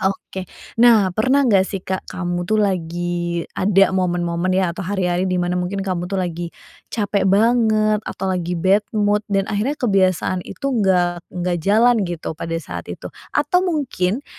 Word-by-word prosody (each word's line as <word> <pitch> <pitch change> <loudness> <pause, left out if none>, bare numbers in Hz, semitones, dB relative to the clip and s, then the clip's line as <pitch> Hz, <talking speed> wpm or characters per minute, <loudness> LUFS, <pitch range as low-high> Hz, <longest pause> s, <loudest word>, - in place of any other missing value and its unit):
oke. 190 -1 -3 0.3
Nah, 215 -6 +6
pernah 265 +7 +3
enggak 195 -5 +5
sih 195 - -3
Kak, 190 0 -4
kamu 175 -1 -3
tuh 215 - +2
lagi 175 -2 -1
ada 195 0 +3
momen-momen 175 -1 0
ya 185 -2 +1
atau - - -7
hari-hari 185 -1 0
di 180 - +1
mana 175 0 0
mungkin 185 +2 -2
kamu 180 -2 -2
tuh 195 - -1
lagi 175 -1 -3 0.4
capek 200 -3 0
banget 215 0 +3
atau 190 - -6
lagi 180 -1 -2
bad 190 +4 +4 0.2
mood 205 0 +2
dan 195 -1 +2
akhirnya 230 +9 0
kebiasaan 185 -4 +1
itu 275 +8 -3
enggak 175 -3 +2
enggak 175 -1 -2
jalan 230 +5 +4
gitu 170 -2 -4
pada 165 +1 -4
saat - - -8
itu? - - -7 0.3
Atau 360 -1 +3
mungkin 275 - -1
190 Hz, 165 wpm, -20 LUFS, 175-210 Hz, 0.4 s, Nah